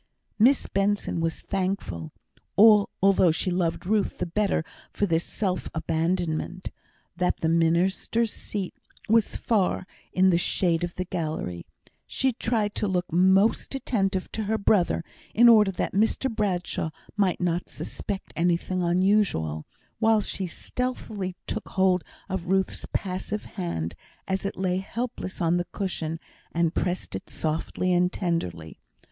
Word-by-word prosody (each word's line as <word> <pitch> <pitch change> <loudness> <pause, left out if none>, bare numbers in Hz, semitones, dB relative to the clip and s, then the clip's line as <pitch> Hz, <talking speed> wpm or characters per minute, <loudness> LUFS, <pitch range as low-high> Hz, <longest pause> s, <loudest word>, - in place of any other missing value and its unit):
Miss 255 +5 +5
Benson 200 -2 0
was 165 0 -1
thankful 185 - -3 0.5
(although 200 -3 +5
she 175 +3 0
loved 175 -1 -1
Ruth 205 +1 +1
the - - -1
better 185 -2 0 0.3
for 205 - 0
this 165 -3 +1
self 185 -4 -2
abandonment) 165 +2 -1 0.4
that 180 +1 0
the 160 - +1
minister's 175 +7 +2
seat 195 -3 -4 0.3
was 225 0 +3
far 200 -5 +1 0.3
in 185 0 +4
the 170 - +3
shade 175 -1 +1
of 175 0 -3
the 185 - -3
gallery. 155 - -4 0.4
She 265 -1 +1
tried 225 -3 0
to 210 - 0
look 180 -2 -1
most 190 +8 +3
attentive 195 -8 -1
to 220 - -3
her 220 +2 +1
brother, 200 -5 +2 0.3
in 240 +2 +7
order 215 -4 +7
that 190 - -2
Mr 225 +4 +1
Bradshaw 185 -6 -1 0.3
might 195 -4 +1
not 175 -1 -1
suspect 165 +7 -5
anything 175 +2 +1
unusual, 175 - +1 0.3
while 220 -1 +4
she 195 -2 -3
stealthily 210 -2 -4
took 220 - -3
hold 185 -2 +2 0.2
of 190 -3 -4
Ruth's 190 +1 0
passive 195 +2 -3
hand, 85 - -4 0.3
as 190 +1 -1
it - - -6
lay 185 -1 0
helpless 195 0 -4
on 170 +1 +3
the 175 - -1
cushion, 165 -5 -3 0.3
and 170 0 +1
pressed 180 - -2
it 95 - -7
softly 165 +3 -1
and 180 +1 +3
tenderly. 90 - -3
185 Hz, 140 wpm, -26 LUFS, 170-205 Hz, 0.5 s, in